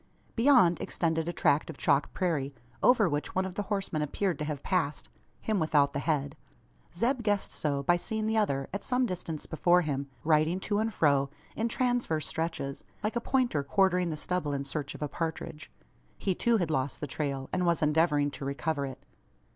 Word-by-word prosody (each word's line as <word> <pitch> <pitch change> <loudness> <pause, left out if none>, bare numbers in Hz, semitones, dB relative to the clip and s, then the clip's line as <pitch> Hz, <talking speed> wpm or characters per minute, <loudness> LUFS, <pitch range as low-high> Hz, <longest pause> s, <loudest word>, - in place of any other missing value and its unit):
Beyond, 230 -9 +5
extended 165 -1 -1
a - - 0
tract 150 -3 +2
of - - -7
chalk 140 - +2
prairie; 145 -7 -1 0.3
over 235 -5 +5
which 145 -2 -2
one 190 0 +1
of 190 - -5
the 205 - -2
horsemen 195 -7 -1
appeared 170 +3 -1
to 150 - -2
have 150 -2 -4
passed 165 -6 -1 0.3
him 215 -3 0
without 150 -3 +3
the 140 - -1
head. 145 -2 -1 0.6
Zeb 235 +8 0
guessed 205 -3 0
so, 140 -2 -1
by 175 +5 +4
seeing 220 +4 -2
the 220 +1 0
other, 140 -11 +1
at 200 - -3
some 250 0 +1
distance 170 -6 -4
before 175 +2 +3
him, 140 -3 -3
riding 155 +3 +3
to 205 +1 0
and 220 +1 0
fro, 140 -7 +2 0.3
in 225 - 0
transverse 240 - 0
stretches, 160 -4 -3 0.2
like 215 +3 -1
a 235 - 0
pointer 250 - +1
quartering 180 +4 +2
the 155 - -3
stubble 165 -2 -2
in 140 0 -2
search 140 0 -4
of - - -5
a - - 0
partridge. 160 -1 -5 0.5
He 190 - 0
too 235 +5 +2
had 175 -6 -1
lost 135 -2 -1
the - - -3
trail, 140 -2 -3
and 180 - +1
was 170 -2 +2
endeavouring 150 -1 +3
to 140 - -8
recover 140 +1 -2
it. 130 - -9
160 Hz, 195 wpm, -29 LUFS, 145-195 Hz, 0.6 s, Beyond